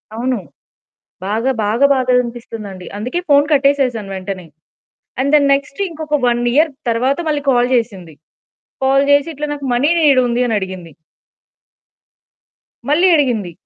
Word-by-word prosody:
అవును. 245 0 -1 0.9
బాగా 225 +6 0
బాగా 230 +7 +2
బాధగా 255 -2 +2
అనిపిస్తుందండి. 225 -6 -8
అందుకే 250 +11 -3
ఫోన్ 285 0 +5
కట్టేసేసాను 270 -7 +1
వెంటనే. 185 -1 -6 0.8
అండ్ 280 +2 0
ద - - +6
నెక్స్ట్ 280 +3 -3
ఇంకొక 305 -2 -3
1 240 0 +1
ఇయర్ 305 +2 +3 0.2
తర్వాత 250 +4 0
మళ్ళీ 295 -2 0
కాల్ 245 -1 +2
చేసింది. 195 -9 -3 0.7
కాల్ 270 +1 +3
జేసి 285 +2 +4
"ఇట్లా 300 +1 -4
నాకు 280 -1 -7
మనీ 255 +5 +2
నీడుంది" 255 -5 +3
అని 225 - 0
అడిగింది. 185 -3 -7 2.0
మళ్ళీ 335 +6 +4
అడిగింది. 240 - 0
250 Hz, 125 wpm, -17 LUFS, 220-285 Hz, 2.0 s, ద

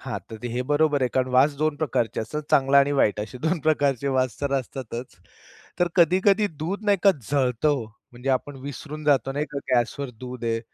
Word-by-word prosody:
हां, - - -4
तर 110 +2 -7
हे 125 +2 -2
बरोबर 145 -1 +2
आहे 125 - +2
कारण 130 0 +2
वास 135 +4 +5
2 155 -1 +1
प्रकारचे 125 -6 -1
असतात. 125 +8 -4
चांगला 135 0 +5
आणि 140 +1 +3
वाईट 105 -7 +2
असे 115 +4 -7
2 160 +6 0
प्रकारचे 140 -3 +1
वास 130 -3 -1
तर 140 -1 -1
असतातच. 125 -1 -7 0.6
तर 175 - +2
कधी-कधी 190 +4 +4 0.2
दूध 195 +6 -3
नाही 205 -1 +3
का 200 - +7 0.2
जळतं 130 -1 +1
ओ, 140 -5 0 0.3
म्हणजे 125 +2 -7
आपण 135 +2 -1
विसरून 145 +2 -7
जातो 135 -3 +2
नाही 145 +2 -2
का, 140 - -3 0.2
गॅसवर 125 +3 0
दूध 125 -1 -6
आहे. 115 0 0
140 Hz, 195 wpm, -24 LUFS, 125-150 Hz, 0.6 s, का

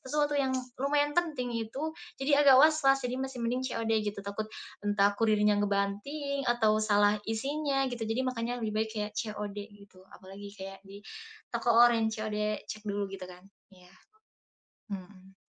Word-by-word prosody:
sesuatu 295 +2 0
yang 265 -1 +1 0.2
lumayan 290 +2 +2
penting 300 -8 0
itu 230 +7 -3 0.3
jadi 285 +1 +3
agak 280 -2 +8
was-was, 275 -4 +4
jadi 250 +1 -2
masih 265 -3 -4
mending 250 +2 0
COD 225 -2 -2
gitu 205 -1 -4
takut, 200 +2 -4 0.3
entah 205 -1 +3
kurirnya 210 -2 +3
ngebanting 205 +8 -1
atau 220 -3 +3
salah 205 -1 +3
isinya 275 +4 0
gitu 230 -2 -3
jadi 225 +4 0
makanya 245 -1 -2
lebih 215 - -2
baik 220 0 0
kayak 210 0 -3
COD 210 -3 -4 0.2
gitu, 200 -2 -17
apalagi 195 +2 -11
kayak 195 -1 -8
di 200 +1 -11 0.5
toko 235 0 +1
oranye 230 -2 +5
COD 215 -1 -3 0.3
cek 215 - -7
dulu 205 0 -1
gitu 190 -2 -7
kan, 180 0 -12 0.3
iya, 180 0 -19 1.0
mmm. 190 -1 -9
220 Hz, 155 wpm, -30 LUFS, 205-265 Hz, 1.0 s, agak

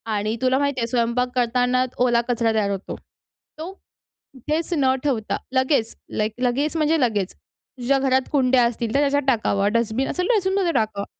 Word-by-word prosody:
आणि 215 +2 -1
तुला 260 0 +2
माहिती 280 -2 -1
आहे 230 - -1
स्वयंपाक 240 +1 0
करतानाच 250 +1 +1
ओला 235 -1 +3
कचरा 230 -1 +1
तयार 215 -2 +1
होतो. 195 0 -5 0.6
तो 330 +4 -5 0.4
कुठेच 305 +6 -4
न 265 -2 +3
ठेवता, 245 -7 -1 0.2
लगेच, 260 -3 +1 0.3
लाइक 215 0 -1
लगेच 275 +6 0
म्हणजे 315 +1 +2
लगेच, 210 -6 0
तुझ्या 270 +2 -4
घरात 265 -1 +1
कुंड्या 260 -3 +3
असतील 235 -1 -2
तर 280 - +3
त्याच्यात 285 0 +2
टाकावं 205 -5 +1
डस्टबिन 230 +3 0
असेल 360 0 -2
डस्टबिनमध्ये 380 -2 +1
टाकावं. 215 -4 -1
255 Hz, 160 wpm, -22 LUFS, 230-280 Hz, 0.6 s, ओला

